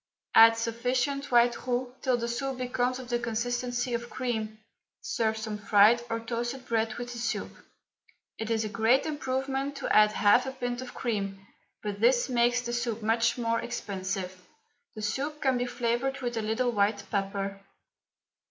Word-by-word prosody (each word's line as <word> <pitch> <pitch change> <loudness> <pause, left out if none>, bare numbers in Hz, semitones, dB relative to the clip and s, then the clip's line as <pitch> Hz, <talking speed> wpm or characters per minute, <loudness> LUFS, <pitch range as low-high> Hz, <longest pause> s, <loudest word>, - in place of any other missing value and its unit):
Add 225 0 +8
sufficient 250 +5 -1
white 240 +1 +3
roux 250 0 -1
till 255 -2 +2
the 235 0 -3
soup 250 +3 -3
becomes 250 0 -1
of 255 -2 -9
the 240 -1 +1
consistency 245 +1 -2
of 235 0 -3
cream. 220 -4 -3 0.4
Serve 230 -11 -1
some 220 -1 -4
fried 210 +3 +5
or 230 0 -1
toasted 240 +3 -4
bread 225 -2 0
with 245 0 -6
the 235 - -6
soup. 235 - -2 0.9
It 220 0 -3
is 225 -1 +1
a - - -3
great 225 +5 +3
improvement 270 -1 -2
to 275 - -1
add 215 0 +6
half 215 +6 +4
a 265 - -4
pint 245 -1 -3
of 255 - -9
cream, 200 -4 -3 0.4
but 205 -1 -4
this 240 +2 +4
makes 245 0 +2
the 240 -1 -4
soup 235 -2 -2
much 230 +2 +2
more 230 -1 0
expensive. 190 -5 -4 0.5
The 215 - -6
soup 280 +8 -2
can 265 -3 +1
be 245 - -1
flavoured 245 +3 -1
with 240 -1 -2
a 225 - -1
little 225 +3 0
white 205 -1 +1
pepper. 195 -1 -2
240 Hz, 170 wpm, -28 LUFS, 220-250 Hz, 0.9 s, Add